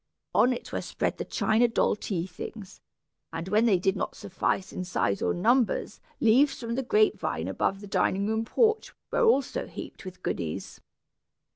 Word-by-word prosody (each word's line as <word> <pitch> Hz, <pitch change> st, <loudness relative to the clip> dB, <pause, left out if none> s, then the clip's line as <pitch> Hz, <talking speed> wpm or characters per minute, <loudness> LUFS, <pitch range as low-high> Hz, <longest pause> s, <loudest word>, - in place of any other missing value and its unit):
On 250 Hz, -, +5 dB
it 245 Hz, -, -5 dB
were -, -, -1 dB
spread -, -, -2 dB
the -, -, -1 dB
china 225 Hz, +2 st, +2 dB
doll 230 Hz, -, +2 dB
tea 185 Hz, -5 st, -3 dB
things, 190 Hz, +2 st, -9 dB, 0.5 s
and 165 Hz, +2 st, -5 dB
when 215 Hz, +3 st, +4 dB
they 200 Hz, -5 st, +5 dB
did 190 Hz, +2 st, +1 dB
not -, -, -3 dB
suffice 190 Hz, 0 st, -2 dB
in 185 Hz, -, -3 dB
size 140 Hz, -, 0 dB
or 90 Hz, -, +1 dB
numbers, 230 Hz, -, +1 dB, 0.2 s
leaves 255 Hz, +6 st, +4 dB
from 230 Hz, -1 st, -4 dB
the 265 Hz, -, 0 dB
grape 425 Hz, -, +3 dB
vine -, -, -2 dB
above 195 Hz, 0 st, -1 dB
the -, -, -8 dB
dining 195 Hz, 0 st, +1 dB
room 220 Hz, +1 st, 0 dB
porch, 445 Hz, -, +1 dB, 0.2 s
were -, -, +2 dB
also 455 Hz, -, +2 dB
heaped -, -, -9 dB
with 185 Hz, -1 st, -10 dB
goodies. 80 Hz, -2 st, -4 dB
220 Hz, 175 wpm, -28 LUFS, 185-250 Hz, 0.5 s, On